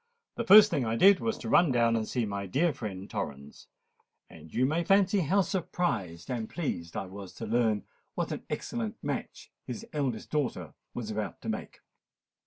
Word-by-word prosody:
The 235 - -3
first 210 -1 +9
thing 145 -6 +1
I 115 -1 -1
did 195 +10 +6
was 225 -1 -1
to - - -7
run 170 -5 +5
down 115 -2 +3
and 110 -1 -1
see 120 -3 -1
my 100 -1 -4
dear 150 - +2
friend 100 -5 -6
Torrens: 75 -9 -6 0.6
and 80 - -13
you 130 - +2
may 160 +5 +1
fancy 195 +2 +4
how 185 +4 +3
surprised 135 - -2
and 115 -3 -3
pleased 85 - -4
I - - -2
was 95 0 -9
to 115 - -6
learn 110 -2 +1 0.3
what - - -2
an - - -4
excellent 115 -3 -3
match - - -5 0.2
his 125 - -6
eldest 135 -7 -2
daughter 105 - -2 0.2
was 110 -3 -4
about 105 -4 -4
to - - -5
make." - - -5
120 Hz, 185 wpm, -29 LUFS, 100-170 Hz, 0.6 s, first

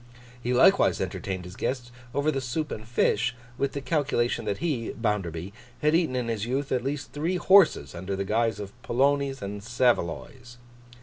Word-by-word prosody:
He 120 - -2
likewise 125 - +5
entertained 95 -2 -3
his 90 +1 -9
guest 125 0 -3 0.2
over 145 +2 +2
the 135 - -2
soup 150 +5 -3
and 110 0 -6
fish, 115 0 +1 0.2
with 140 -1 0
the 140 - -3
calculation 130 -6 0
that 100 -2 -1
he 145 -10 -2
(Bounderby) 95 -5 -2 0.3
had 150 +1 +4
eaten 165 -6 +2
in 125 -2 -1
his 110 -3 -2
youth 135 +4 -2
at 125 -2 +1
least 135 0 -3
three 160 +5 -1
horses 190 0 +5
under 95 +3 -4
the 100 0 -2
guise 110 +1 +1
of 100 -1 -7
polonies 135 0 +1
and 100 +1 -5
saveloys. 120 +1 -1
120 Hz, 175 wpm, -27 LUFS, 105-140 Hz, 0.3 s, likewise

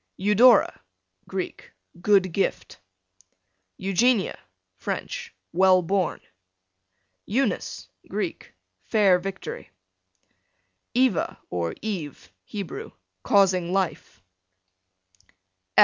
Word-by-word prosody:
Eudora, 210 +4 +5 0.5
Greek, 190 -1 -5 0.3
good 195 -2 +4
gift. 195 - -2 1.0
Eugenia, 195 +3 +2 0.4
French, - - -5 0.2
well 185 0 +5
born. 185 -1 0 1.1
Eunice, 260 +7 -1 0.2
Greek, - - -4 0.3
fair 200 -5 +4
victory. 190 - -6 1.3
Eva, 255 -6 +2
or 85 -2 -2
Eve, 180 -10 -5
Hebrew, 200 -4 -6 0.3
causing 185 - +3
life. 185 - -2
190 Hz, 70 wpm, -25 LUFS, 180-210 Hz, 1.3 s, Eudora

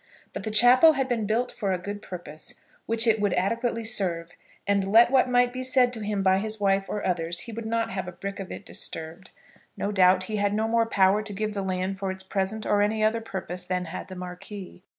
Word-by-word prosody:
But - - -5
the 220 - -4
chapel 245 +8 +7
had 270 -2 -1
been 230 -5 -1
built 235 +4 0
for 200 -3 -2
a 185 - +1
good 205 +3 -6
purpose 175 -5 -6 0.3
which 230 +1 +3
it 220 -2 +3
would 205 -3 +1
adequately 230 +4 -1
serve, 180 -7 0 0.3
and 200 -1 +2
let 235 +3 +6
what 260 -1 +4
might 245 0 +3
be 255 - -4
said 255 -1 +3
to 230 - -4
him 205 -2 -2
by 190 0 +4
his 215 +1 -4
wife 195 -1 +1
or 210 - -3
others, 170 -1 -1
he 235 - -8
would 225 0 -6
not 230 0 -1
have 190 -2 -4
a - - -5
brick 200 +3 -6
of 195 - -7
it 200 - -8
disturbed. 165 +3 -6 0.5
No 205 - -2
doubt 185 -1 +4
he 215 +3 -3
had 205 0 +1
no 220 +1 0
more 230 0 +2
power 195 -1 +3
to 215 -1 -8
give 215 +1 -3
the 200 - -3
land 190 0 -2
for 195 -1 -2
its 190 0 -5
present 195 +3 -3
or 205 -1 +2
any 215 +1 +1
other 225 +1 +2
purpose 180 -4 -5
than 180 0 -2
had 165 +2 -7
the 185 - -9
Marquis. 180 +1 -9
205 Hz, 235 wpm, -26 LUFS, 190-225 Hz, 0.5 s, chapel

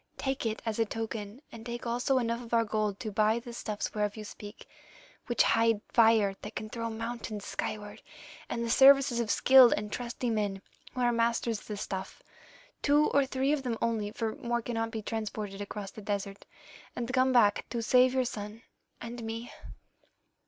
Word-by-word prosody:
Take 270 -3 -2
it 220 0 -4
as 225 0 -2
a 225 - +3
token, 220 +2 -5
and 225 -1 -10
take 240 +1 -6
also 245 +3 +1
enough 235 -1 -1
of 235 -1 -2
our 230 - +4
gold 215 -2 -1
to 215 - -4
buy 215 +2 +2
the 235 0 -7
stuffs 215 -3 -4
whereof 210 0 -1
you 215 - -6
speak, 205 +1 -10 0.6
which 240 - +3
hide 225 -2 +3
fires 220 -4 +4
that 210 - -8
can 215 0 -5
throw 230 -1 -3
mountains 225 -2 -5
skyward, 205 -1 -5 0.5
and 235 0 -2
the - - -3
services 275 -1 +6
of 230 -2 -1
skilled 260 0 +7
and 210 0 -4
trusty 245 0 -3
men 205 -3 -2 0.3
who 255 - -2
are 240 0 +3
masters 230 -1 0
of - - -17
the 210 - -5
stuff, 190 -1 -6 0.6
two 295 +1 +3
or 280 -1 +3
three 265 +1 0
of 300 - 0
them 245 -3 -2
only, 220 -3 -1
for 220 +1 -3
more 240 -4 -2
cannot 225 -1 -2
be 220 -1 -5
transported 210 -2 -4
across 205 -1 -6
the 215 - -10
desert, 200 -1 -4 0.5
and 245 +1 -4
come 260 0 +3
back 215 -5 +3
to 235 -1 -3
save 255 +2 +4
your 260 -1 +2
son 215 0 -6 0.4
and 235 0 -7
me. 225 +1 -5
230 Hz, 190 wpm, -30 LUFS, 210-240 Hz, 0.6 s, skilled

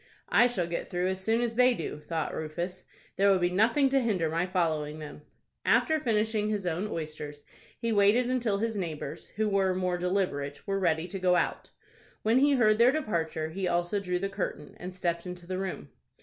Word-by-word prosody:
"I 245 - +6
shall 225 -8 -1
get 170 0 -4
through 180 +1 0
as 190 0 -3
soon 225 +3 +2
as 235 -1 0
they 250 +1 +4
do," 160 -3 -5
thought 160 0 -3
Rufus. 175 +4 -4 0.3
"There 200 +1 +4
will 195 - +5
be 175 0 +1
nothing 230 +9 +3
to 270 0 +3
hinder 190 -10 0
my 170 +3 0
following 155 -4 -1
them." 150 -1 -9 0.4
After 315 0 +3
finishing 220 -4 0
his 205 -3 -2
own 175 +4 -1
oysters, 150 -4 -6 0.4
he 230 - -1
waited 210 +4 +4
until 240 -5 +1
his 220 0 -1
neighbors, 155 -4 -5
who 220 0 +1
were 195 -2 +2
more 180 -1 -1
deliberate, 175 -6 -1
were 195 -1 -1
ready 165 -3 +1
to 195 +1 -5
go 180 -1 +3
out. - - -1 0.5
When 225 +4 +4
he 285 +1 +4
heard 215 -4 +4
their 240 +2 +7
departure, 165 - -2
he 190 +2 -2
also 175 +4 0
drew 180 -2 -1
the 195 +2 -1
curtain, 195 -6 -5
and 180 +1 -6
stepped 175 -1 -2
into 180 -1 -7
the 185 +1 -3
room. 190 -1 -5
185 Hz, 200 wpm, -29 LUFS, 170-215 Hz, 0.5 s, their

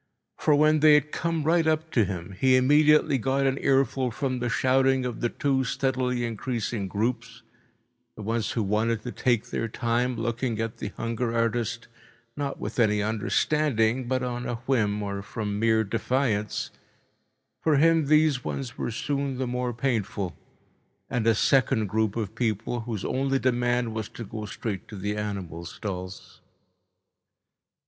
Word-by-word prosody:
For 150 - +4
when 155 +1 +4
they 150 0 +7
had 150 0 +2
come 165 -2 -1
right 165 +1 +3
up 160 +1 0
to 115 -4 +3
him, 90 -1 -5
he 130 -1 +5
immediately 150 +2 +4
got 135 +3 +1
an 135 0 +1
earful 135 -1 +2
from 130 +1 -2
the 120 0 -1
shouting 130 +2 +2
of 120 -3 -4
the 120 - +1
two 135 -1 0
steadily 125 -1 0
increasing 115 -2 -3
groups, 115 +3 -3 0.7
the 110 - -8
ones 115 +1 -1
who 115 - 0
wanted 110 +2 0
to 125 - -5
take 120 -3 0
their 115 - -1
time 120 +3 0
looking 115 0 -2
at 115 0 -3
the - - -4
hunger 115 0 -2
artist, 115 0 -1 0.5
not 140 -1 -3
with - - -5
any 105 -3 +3
understanding 115 +2 +1
but 130 0 0
on 125 0 -3
a 120 - -1
whim 105 -6 +1
or 100 -1 -3
from 105 0 -4
mere 110 0 +3
defiance—for 115 +6 -3
him 165 0 +4
these 150 -3 +3
ones 130 -4 -5
were - - -1
soon 140 +3 -2
the 130 - -1
more 125 0 -2
painful—and 115 -1 -4
a 115 - +5
second 115 -2 +3
group 110 +1 0
of 110 -3 -3
people 115 +1 -1
whose 110 -3 -4
only 135 +1 0
demand 120 -2 +1
was 110 -1 -4
to 115 - -8
go 110 0 -6
straight 105 -1 -5
to 110 - -9
the 105 +2 -3
animal 95 -6 -4
stalls. 90 +1 -7
120 Hz, 155 wpm, -26 LUFS, 110-135 Hz, 0.7 s, they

